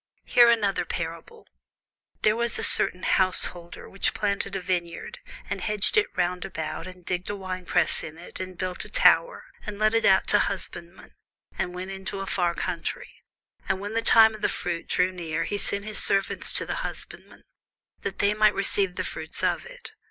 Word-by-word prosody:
Hear 240 -1 +6
another 210 -4 +2
parable: 165 -1 -6 0.8
There 215 - +4
was 235 0 0
a - - -3
certain 185 - +6
householder, 180 -2 0
which 195 - -1
planted 200 -1 -2
a - - -1
vineyard, 175 -2 -4 0.3
and - - -4
hedged 210 - 0
it 425 -1 +4
round 180 0 0
about, 175 -2 -5
and 185 -1 -12
digged 180 0 -3
a 205 - -2
winepress 185 -2 0
in 160 -1 -8
it, 170 - -10
and 185 -1 -7
built 185 -1 -3
a - - -11
tower, - - +3 0.2
and 210 -1 -6
let 215 +1 +2
it 225 - +2
out 190 -1 +4
to 205 - +5
husbandmen, 185 -2 -5 0.4
and 180 - -3
went 185 +2 -6
into 190 0 -6
a 195 - -4
far 175 -3 0
country: - - -4 0.6
and 195 - 0
when 205 +2 -6
the 230 - +1
time 220 -1 +6
of 215 - -10
the - - +1
fruit 170 -1 -4
drew 180 +1 +1
near, 165 -3 -3
he 205 +4 -2
sent 200 +1 +2
his 215 -1 -3
servants 195 0 +1
to - - +3
the - - -4
husbandmen, - - -8 0.6
that 195 - -5
they 205 +1 +2
might 215 0 +3
receive 195 -1 +1
the - - -2
fruits - - -5
of - - 0
it. - - -11
190 Hz, 190 wpm, -25 LUFS, 180-210 Hz, 0.8 s, Hear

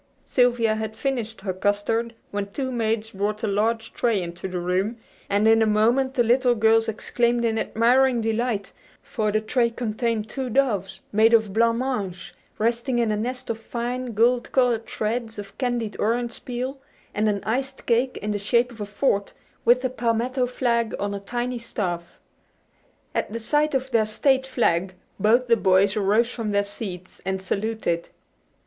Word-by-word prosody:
Sylvia 240 -3 +3
had 220 0 -4
finished 230 -3 -3
her 190 -1 -2
custard 205 +4 0 0.2
when 200 0 -3
two 260 +3 -3
maids 225 -2 -1
brought 210 +2 -2
a - - +1
large 225 +3 0
tray 230 -4 +1
into 175 +1 -5
the 185 -1 -4
room, 185 +6 -1 0.3
and 205 +2 +3
in 225 0 +5
a 220 - +4
moment 240 +5 +2
the 240 - +4
little 245 +1 +3
girls 225 0 +3
exclaimed 235 +2 0
in 225 -1 +1
admiring 245 +2 +3
delight; 225 -2 -1 0.3
for 215 -2 -1
the 215 - +2
tray 235 +2 +1
contained 230 -1 -2
two 260 +2 -4
doves, 205 -7 0
made 220 +2 +5
of 220 -3 +1
blanc 230 +1 +3
mange, 225 -9 -3 0.2
resting 235 +3 0
in 230 -2 +2
a - - +1
nest 245 +3 -3
of 225 - -5
fine, 240 +2 -4
gold 240 +3 +2
colored 245 -3 +2
shreds 225 +1 -2
of 200 -1 -8
candied 240 -4 -1
orange 235 +2 -1
peel, 255 +2 -4 0.3
and 215 +1 +1
an 200 -1 -1
iced 265 +4 -3
cake 245 +2 +1
in 210 - -1
the 205 - -1
shape 235 +4 +2
of 225 -3 -10
a 205 - -3
fort, 205 -1 0 0.3
with 245 +2 +5
the 255 - 0
palmetto 245 +2 0
flag 235 -2 0
on 200 0 -2
a 200 - -3
tiny 240 +4 -3
staff. 180 -7 -4 0.9
At - - -1
the 230 - -3
sight 295 +5 +1
of 265 0 -1
their 225 -3 +3
State 265 +4 +2
flag 190 -8 +1 0.2
both 230 +5 +4
the 230 -1 +4
boys 195 +1 +3
arose 215 +4 +2
from 225 -3 -4
their 200 0 +2
seats 195 -3 -8
and 190 +1 -2
saluted. 195 -3 -2
225 Hz, 175 wpm, -24 LUFS, 210-245 Hz, 0.9 s, in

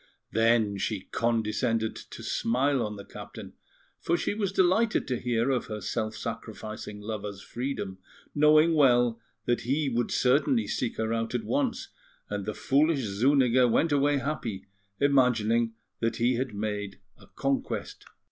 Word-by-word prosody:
Then 115 -3 +2
she 105 0 -2
condescended 115 +1 0
to - - -10
smile 130 +2 +1
on 105 -1 -4
the 100 - -9
captain, - - -10 0.5
for 170 - +1
she - - -1
was 205 -2 -1
delighted 195 +4 +2
to 125 -2 -1
hear 120 +1 +1
of 125 -1 -1
her 110 -2 -5
self 110 +2 -3
sacrificing 110 -2 -6
lover's 105 -2 -5
freedom, 120 -7 -4 0.3
knowing 155 +2 +5
well 120 -5 +4 0.2
that 120 - +1
he 140 +4 0
would 120 -1 0
certainly 150 - +2
seek 120 - -2
her 110 0 -1
out 115 +1 -2
at 120 - -1
once; 270 -4 -1 0.4
and 105 -1 -3
the 110 - -2
foolish 145 +1 +2
Zuniga 125 +4 +3
went 155 +7 +2
away 145 0 +3
happy, 125 -9 -3 0.3
imagining 120 -5 +3 0.2
that 115 0 0
he 120 +2 +2
had 125 +1 -2
made 105 -1 -3 0.2
a - - -17
conquest. 135 -1 -3
120 Hz, 145 wpm, -28 LUFS, 110-140 Hz, 0.5 s, knowing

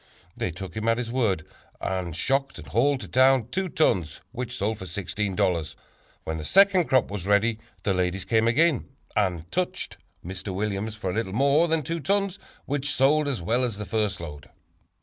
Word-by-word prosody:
They - - -2
took 90 +1 -7
him 110 +1 -2
at 115 0 +3
his 120 -1 -3
word 110 -10 +1 0.3
and 90 -4 -2
shocked 135 +9 0
and - - -9
hauled 135 +3 +2
to - - -7
town 130 -2 +4
two 190 +6 -1
tons 90 - +1
which 125 -1 -4
sold 105 +2 -1
for 95 - -6
$16. 95 -2 -1 0.5
When 80 0 -3
the - - -5
second 195 - +5
crop 130 -8 +2
was 100 -2 -4
ready 110 +2 +3 0.2
the 100 - +2
ladies 90 +1 -1
came 115 0 +3
again, 150 +4 +3 0.3
and 90 -6 0
'touched' 180 0 -2 0.3
Mr. 95 +1 -5
Williams 105 +1 -2
for 95 -4 -3
a - - -4
little 105 -4 -2
more 140 +7 +4
than 160 -1 +1
two 165 +5 -2
tons 195 +5 0 0.3
which 145 +1 -1
sold 145 +3 +3
as 125 -11 -2
well 120 +8 +1
as 115 -5 -1
the 105 - -5
first 105 -2 -1
load." 75 -4 -8
110 Hz, 190 wpm, -26 LUFS, 95-135 Hz, 0.5 s, second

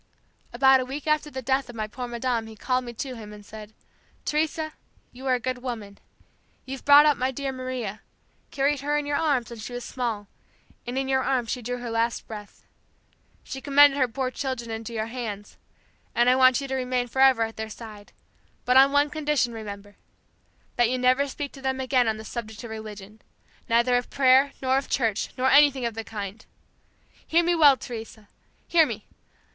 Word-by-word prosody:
"About 265 +2 +5
a 255 - -2
week 275 +3 -6
after 305 -1 +1
the 260 -2 -6
death 265 +1 0
of 240 - -9
my 215 -1 -2
poor 245 +4 -6
madame 235 -1 -2
he 220 - -11
called 255 +4 -1
me 240 - -7
to 255 +2 -5
him 215 -2 -9
and 210 -1 -12
said, 215 0 -10 0.5
'Teresa, 310 +1 -1 0.4
you 260 +2 -9
are 255 - +4
a - - -2
good 255 +1 -3
woman. 220 -6 -6 0.7
You've 265 0 -7
brought 285 +1 +8
up 295 -2 +4
my 255 +1 0
dear 270 +1 -3
Maria, 255 -5 -5 0.5
carried 280 +1 0
her 290 +2 0
in 295 - -2
your 290 0 0
arms 275 -8 0
when 235 - -8
she 220 +3 -7
was 245 0 -5
small, 230 -5 -3 0.6
and 245 +2 -3
in 270 0 -1
your 265 0 +2
arms 250 -5 0
she 250 - -3
drew 245 +2 -3
her 240 -1 -6
last 230 +1 -1
breath. 210 -2 -10 0.8
She 265 - -7
commended 285 +1 +6
her 255 - +3
poor 255 +2 -3
children 255 -4 -4
into 225 +1 -5
your 220 -1 -2
hands, 225 -4 -6 0.6
and 240 +1 +5
I - - +4
want 255 +1 +5
you 275 - -5
to 265 - -4
remain 250 -1 -1
forever 265 -1 +4
at 225 0 -4
their 220 0 -5
side, 215 -2 -11 0.5
but 250 +1 +4
on 270 +1 +7
one 285 +1 +3
condition, 300 -6 0
remember 205 -2 -8 0.8
that 240 -1 +4
you 255 - 0
never 255 +3 +3
speak 280 +1 -5
to 270 - -13
them 265 0 -1
again 255 -2 +2
on 220 -1 0
the 220 - -9
subject 220 -2 -7
of 235 - -8
religion, 215 -1 -9 0.5
neither 235 +2 +3
of 245 - -3
prayer, 270 +1 +4
nor 260 +1 +3
of 275 - -9
church, 225 -5 0
nor 260 +1 +2
anything 275 -3 +5
of 235 - -2
the 225 +1 -5
kind. 210 -1 -7 0.8
Hear 335 +2 +3
me 345 +1 +2
well, 295 -5 +6
Teresa! 220 -4 -9 0.4
Hear 325 -3 +5
me! 220 -4 -6
250 Hz, 200 wpm, -25 LUFS, 225-270 Hz, 0.8 s, brought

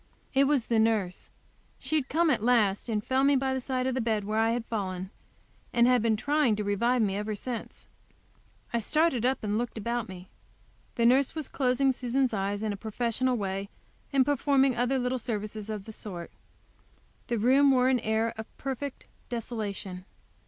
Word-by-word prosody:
It 275 0 +4
was 275 -4 +2
the 230 -2 +1
nurse. 220 -5 0 0.5
She 315 - -3
had 285 -4 0
come 330 +1 +3
at 240 - +1
last, 220 -3 +2
and 210 -2 -1
found 265 +1 +2
me 285 - +4
by 265 0 +1
the 260 - -2
side 255 0 -1
of 260 - 0
the 260 - -1
bed, 220 -2 0
where 215 +2 -1
I 225 0 +3
had 230 0 -1
fallen, 190 -4 -4 0.6
and 235 0 +4
had 250 -1 +4
been 225 -1 +2
trying 285 -1 +2
to 210 - -2
revive 230 +4 +2
me 195 -2 0
ever 210 +1 -3
since. 240 +3 -6 0.9
I 235 - +2
started 265 0 +2
up 265 -2 -1
and 210 +1 0
looked 240 -1 -4
about 235 0 -2
me. 185 0 -9 0.7
The 235 - +2
nurse 260 +5 +4
was 310 -3 -3
closing 265 0 +2
Susan's 255 0 0
eyes 200 +1 -1
in 215 -1 -1
a - - -6
professional 235 +4 -1
way, 195 -1 -3 0.4
and 270 -2 +4
performing 275 -2 +3
other 245 +3 +1
little 250 0 -1
services 215 -2 -4
of 210 -3 -4
the 220 - -9
sort. 180 -6 -7 1.0
The 235 - 0
room 265 +6 +5
wore 255 -1 +4
an 260 -1 +3
air 220 +1 0
of 220 - -5
perfect 270 +1 -5 0.2
desolation. 210 -6 -4
235 Hz, 190 wpm, -28 LUFS, 210-260 Hz, 1.0 s, room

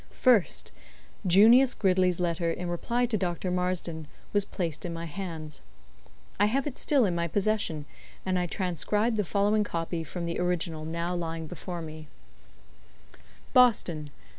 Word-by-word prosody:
First, 205 - +3 0.6
Junius 230 +8 +6
Gridley's 185 -2 +2
letter 170 -1 0
in 180 +1 -4
reply 235 +8 0
to 230 -2 0
Dr. 180 0 -2
Marsden 180 -3 -2 0.3
was 205 -1 +2
placed 170 -7 -4
in 175 - -4
my 165 0 -5
hands. 160 -3 -6 0.8
I 205 - +5
have 265 +5 0
it 290 -4 -4
still 275 -6 +3
in 185 - 0
my 170 0 -1
possession, 195 -5 0 0.4
and 185 -1 +1
I 180 - -1
transcribe 205 +6 0
the 210 - +1
following 205 +3 +2
copy 165 -3 -3
from 170 +3 -5
the 170 - -3
original 170 -3 -1
now 170 +2 -2
lying 165 -2 -3
before 175 +2 -6
me: 155 -1 -9 1.5
"BOSTON, 195 -11 +4
Dec. - - -11
180 Hz, 150 wpm, -28 LUFS, 165-205 Hz, 1.5 s, Junius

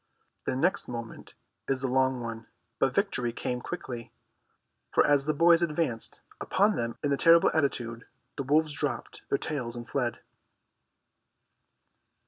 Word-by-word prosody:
The 130 - -1
next 180 +9 +2
moment 115 -2 -7 0.3
is 135 -1 0
the 135 - 0
long 130 0 +2
one, 115 -1 -6 0.3
but - - +2
victory 120 -1 +1
came 125 +1 -3
quickly, 125 -9 -6 0.8
for - - +4
as 145 -1 +3
the 155 - +1
boys 170 +2 +5
advanced 150 -8 -1 0.2
upon 205 +2 +2
them 115 0 -3
in 145 - +1
the 140 - +2
terrible 165 +2 +6
attitude, 120 -6 -1 0.3
the - - -3
wolves 150 +3 +2
dropped 140 -5 -3
their 140 - +2
tails 125 -7 -4
and 120 -1 -7
fled. 120 -1 -1
135 Hz, 140 wpm, -28 LUFS, 120-155 Hz, 0.8 s, terrible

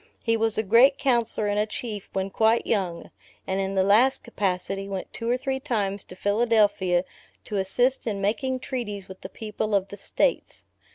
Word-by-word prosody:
He 230 -1 +2
was 225 -1 0
a 220 - +1
great 240 +7 +5
Counsellor 235 -6 +1
and 205 0 0
a 210 - +1
Chief 215 -2 -5
when 190 0 -2
quite 225 +3 +3
young; 185 -6 -2 0.3
and 190 +1 -1
in 195 0 -2
the 190 - +3
last 225 +7 +4
capacity, 195 -2 -2
went 190 -1 -5
two 230 0 -4
or 245 - +2
three 265 0 -2
times 205 -8 -2
to 180 - -11
Philadelphia 205 -4 +2 0.4
to 210 - -3
assist 245 +8 +1
in 205 -3 -1
making 255 +6 -1
treaties 210 -8 -5
with 190 0 -11
the - - -7
people 215 -1 -3
of 195 -1 0
the 200 - -8
states. 355 - -1
210 Hz, 185 wpm, -25 LUFS, 195-235 Hz, 0.4 s, great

